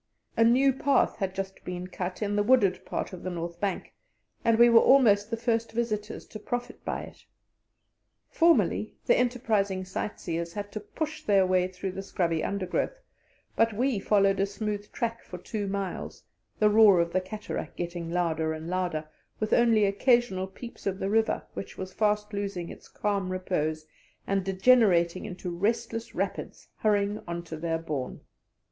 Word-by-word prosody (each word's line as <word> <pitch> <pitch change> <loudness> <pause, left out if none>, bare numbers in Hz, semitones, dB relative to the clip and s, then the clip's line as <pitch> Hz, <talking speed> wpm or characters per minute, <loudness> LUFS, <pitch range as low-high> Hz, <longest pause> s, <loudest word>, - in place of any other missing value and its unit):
A 230 - +4
new 260 +4 +5
path 275 +2 +2
had 190 -3 -2
just 195 0 -5
been 180 0 -5
cut 185 +2 -4
in 205 0 -1
the 205 - +3
wooded 205 -4 +3
part - - -3
of 180 - -7
the 185 - -4
north 170 -1 -5
bank, 195 -1 -3 0.5
and 230 -1 +3
we 235 +1 +8
were 230 -1 +7
almost 220 -7 +5
the 230 - -2
first 230 -1 -1
visitors 220 -2 -2
to 215 - -8
profit 245 +3 -5
by - - -3
it. - - -13 1.0
Formerly 335 0 +2
the - - +5
enterprising 220 -7 0
sight 190 +2 -4
seers 170 0 -3
had 205 0 -5
to 215 - -4
push 310 +9 -5
their 195 -2 +4
way 185 -1 +2
through 185 +1 -5
the 195 - -5
scrubby 170 -4 -1
undergrowth, 200 - -2 0.6
but 225 0 +3
we 245 0 +1
followed 195 -1 +3
a 195 - +2
smooth 205 0 -4
track 230 -1 -2
for 180 - -8
two 205 +3 -4
miles, 195 -1 -4 0.3
the 210 -1 +4
roar 210 -4 +7
of 170 0 0
the 185 - +2
cataract 210 +3 -6
getting 170 -1 -4
louder 160 -2 0
and 160 +2 -6
louder, 175 -4 -1 0.3
with 215 0 -1
only 230 -3 +5
occasional 200 -2 +2
peeps 220 +3 -9
of 190 -1 -1
the 195 +1 -2
river, 220 0 +2
which - - -7
was 185 0 -6
fast 210 0 0
losing 200 -4 -3
its - - -11
calm 200 -3 -2
repose 160 -4 -2 0.4
and 195 -1 0
degenerating 190 -3 +3
into 180 -1 -5
restless 230 +4 -2
rapids - - -4
hurrying 205 -1 +1
on 170 0 -4
to 165 -1 -7
their 165 +1 -1
bourne. 150 -6 -4
200 Hz, 170 wpm, -28 LUFS, 180-225 Hz, 1.0 s, we